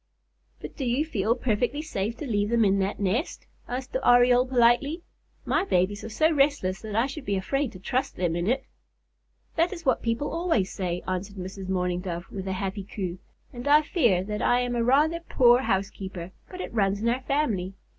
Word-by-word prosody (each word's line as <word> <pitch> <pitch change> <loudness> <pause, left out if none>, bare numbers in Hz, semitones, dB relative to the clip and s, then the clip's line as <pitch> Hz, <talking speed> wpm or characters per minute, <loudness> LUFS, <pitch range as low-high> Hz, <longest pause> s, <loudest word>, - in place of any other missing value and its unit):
"But - - -9
do 280 - -4
you 255 +5 +1
feel 225 -6 0
perfectly 250 +4 -1
safe 225 -7 -3
to 300 - -6
leave 205 -4 0
them 230 -1 +3
in 195 0 +3
that 195 +1 -1
nest?" 210 - -1 0.2
asked 255 +1 -5
the 260 - -1
Oriole 245 +1 +5
politely. 260 +7 +3 0.4
"My - - +1
babies 200 - 0
are - - -6
so 310 +9 +2
restless 275 - +1
that 215 -2 -6
I 230 +3 +3
should 280 +2 -6
be 200 -5 -1
afraid 270 +7 -1
to 185 - -10
trust 255 +8 -2
them 175 -2 -1
in 175 +2 -1
it." 260 +4 0 0.9
"That 335 +2 +3
is 340 -4 -8
what 260 - +2
people 235 +5 -1
always 330 - 0
say," 180 -2 -3
answered 185 +2 -3
Mrs. 190 +1 -7
Mourning 180 -1 0
Dove, 175 -2 -5
with 195 -1 -6
a 190 - -1
happy 195 +1 -3
coo, 185 -2 -5 0.3
"and 245 +2 -6
I 300 +1 +6
fear 235 - +2
that 210 +2 -4
I 245 0 +3
am 245 0 -2
a 235 - +1
rather 300 +7 +3
poor 245 -7 +4
housekeeper, 190 -5 -3 0.2
but 365 0 -7
it - - -6
runs 200 -2 +1
in 225 - -1
our 245 +3 +1
family. 230 -10 -1
Mr. - - -35
230 Hz, 205 wpm, -26 LUFS, 190-265 Hz, 0.9 s, I